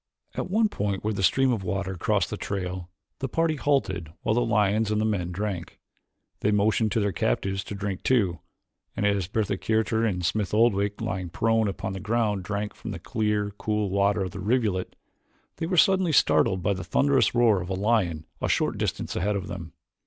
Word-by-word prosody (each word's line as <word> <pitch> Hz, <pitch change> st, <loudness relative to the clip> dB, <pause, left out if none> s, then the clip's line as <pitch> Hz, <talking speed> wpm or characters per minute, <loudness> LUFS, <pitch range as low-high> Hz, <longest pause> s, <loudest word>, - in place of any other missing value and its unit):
At -, -, -4 dB
one 220 Hz, +3 st, +3 dB
point 100 Hz, -, -2 dB
where 110 Hz, +1 st, 0 dB
a 100 Hz, -, -3 dB
stream 135 Hz, +7 st, +3 dB
of 105 Hz, -5 st, -3 dB
water 95 Hz, +1 st, -2 dB
crossed 85 Hz, -, 0 dB
the -, -, -1 dB
trail 90 Hz, -2 st, -4 dB, 0.3 s
the 135 Hz, -, -3 dB
party 165 Hz, +1 st, +1 dB
halted 135 Hz, -, 0 dB
while -, -, +2 dB
the 120 Hz, -, +2 dB
lions 110 Hz, -2 st, +2 dB
and 105 Hz, 0 st, +1 dB
the 110 Hz, -, +1 dB
men 95 Hz, -5 st, -1 dB
drank. 95 Hz, -2 st, -4 dB, 0.6 s
They 105 Hz, -, +1 dB
motioned 105 Hz, +2 st, +2 dB
to -, -, +2 dB
their 100 Hz, -1 st, +1 dB
captives 95 Hz, +6 st, -1 dB
to 100 Hz, -, -6 dB
drink 100 Hz, -2 st, -4 dB
too, 100 Hz, -10 st, +2 dB, 0.6 s
and 105 Hz, -, 0 dB
as 100 Hz, -4 st, +1 dB
Bertha 100 Hz, 0 st, -1 dB
Kircher 110 Hz, 0 st, +1 dB
and 90 Hz, -6 st, 0 dB
Smith 105 Hz, +2 st, 0 dB
Oldwick, 100 Hz, -3 st, +2 dB
lying 90 Hz, -1 st, -3 dB
prone 115 Hz, +4 st, +1 dB
upon 95 Hz, -1 st, -4 dB
the 95 Hz, -, -5 dB
ground 105 Hz, -1 st, 0 dB
drank 105 Hz, +2 st, -3 dB
from -, -, -8 dB
the -, -, -4 dB
clear, 105 Hz, -2 st, -1 dB
cool 105 Hz, -2 st, -1 dB
water 100 Hz, 0 st, +2 dB
of 95 Hz, -, -4 dB
the 95 Hz, -, -7 dB
rivulet, 105 Hz, -3 st, 0 dB, 0.6 s
they 165 Hz, -, -2 dB
were 180 Hz, 0 st, -1 dB
suddenly 190 Hz, -1 st, +4 dB
startled 95 Hz, -, +3 dB
by 100 Hz, -, +2 dB
the 95 Hz, 0 st, -5 dB
thunderous 140 Hz, -3 st, +2 dB
roar 115 Hz, -5 st, +4 dB
of 90 Hz, -, -6 dB
a 95 Hz, -, -1 dB
lion 95 Hz, -6 st, +1 dB, 0.2 s
a -, -, 0 dB
short -, -, +1 dB
distance -, -, -2 dB
ahead 105 Hz, +3 st, 0 dB
of 100 Hz, -1 st, -3 dB
them. 85 Hz, -2 st, -7 dB
105 Hz, 200 wpm, -26 LUFS, 95-110 Hz, 0.6 s, suddenly